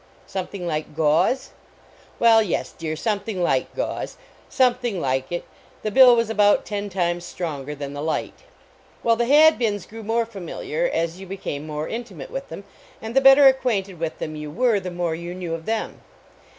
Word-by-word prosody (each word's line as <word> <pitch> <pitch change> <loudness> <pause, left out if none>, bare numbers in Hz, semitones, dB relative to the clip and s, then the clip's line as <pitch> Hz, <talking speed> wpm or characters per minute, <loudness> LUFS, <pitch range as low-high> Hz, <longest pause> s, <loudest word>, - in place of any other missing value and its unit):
Something 190 -1 -5
like 155 -2 -3
gauze? 160 - +2 0.7
Well, 225 -1 +6
yes, 205 -6 -2
dear, 160 -1 -4
something 205 0 -2
like 135 -6 0
gauze; - - -4 0.3
some 255 -2 +4
thing 240 -6 -3
like 130 -2 -1
it; 175 - -3 0.4
the 215 - -1
bill 250 +1 +8
was 230 -1 +1
about 205 -2 +3
ten 205 -1 -4
times 175 -2 -1
stronger 150 -5 -5
than 140 -1 -6
the 145 - -5
light. 160 +1 -2 0.7
Well, 230 -1 +4
the 235 +1 0
Hadbins 250 - +4
grew 225 +3 -10
more 225 +2 0
familiar 230 - -3
as 170 +2 -2
you 190 - -9
became 155 -6 -5
more 150 0 -4
intimate 220 - -7
with 270 +1 -6
them, 200 - -8 0.4
and 225 +2 -7
the 270 - +5
better 270 +1 +8
acquainted 225 -9 +2
with 165 -1 -3
them 155 - -5
you 150 0 -6
were, 225 +6 +2
the 185 -1 -5
more 175 -2 -2
you 170 +2 -6
knew 175 -3 -4
of 165 0 -6
them. 225 0 -3
195 Hz, 180 wpm, -23 LUFS, 165-230 Hz, 0.7 s, bill